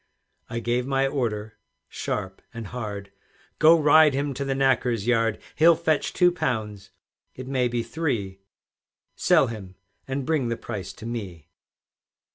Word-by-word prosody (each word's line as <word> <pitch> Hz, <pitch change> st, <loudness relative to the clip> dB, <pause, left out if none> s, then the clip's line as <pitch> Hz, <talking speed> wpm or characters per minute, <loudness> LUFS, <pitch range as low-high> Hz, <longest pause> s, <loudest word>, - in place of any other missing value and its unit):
I 115 Hz, -, -3 dB
gave 120 Hz, +2 st, -1 dB
my 135 Hz, 0 st, +2 dB
order 110 Hz, -6 st, -3 dB, 0.3 s
sharp 95 Hz, -2 st, -4 dB
and 115 Hz, -1 st, -6 dB
hard, 100 Hz, -3 st, -6 dB, 0.5 s
"Go, 165 Hz, +1 st, +7 dB
ride 150 Hz, -1 st, +6 dB
him 140 Hz, 0 st, -1 dB
to 140 Hz, -, -3 dB
the 135 Hz, -1 st, -1 dB
knacker's 125 Hz, -5 st, +1 dB
yard; 115 Hz, -2 st, +2 dB, 0.2 s
He'll 165 Hz, +1 st, +6 dB
fetch 160 Hz, -2 st, 0 dB
two 180 Hz, -1 st, +4 dB
pounds, 110 Hz, -, -3 dB, 0.5 s
it 130 Hz, 0 st, -8 dB
may 130 Hz, -2 st, +1 dB
be 120 Hz, -1 st, -2 dB
three; 115 Hz, -8 st, -3 dB, 0.8 s
Sell -, -, +4 dB
him, 100 Hz, -5 st, -8 dB, 0.3 s
and 135 Hz, 0 st, -3 dB
bring 150 Hz, -5 st, +1 dB
the 115 Hz, 0 st, -2 dB
price 100 Hz, -2 st, -6 dB
to 110 Hz, -, -11 dB
me." 95 Hz, -9 st, -6 dB
120 Hz, 145 wpm, -25 LUFS, 105-140 Hz, 0.8 s, Go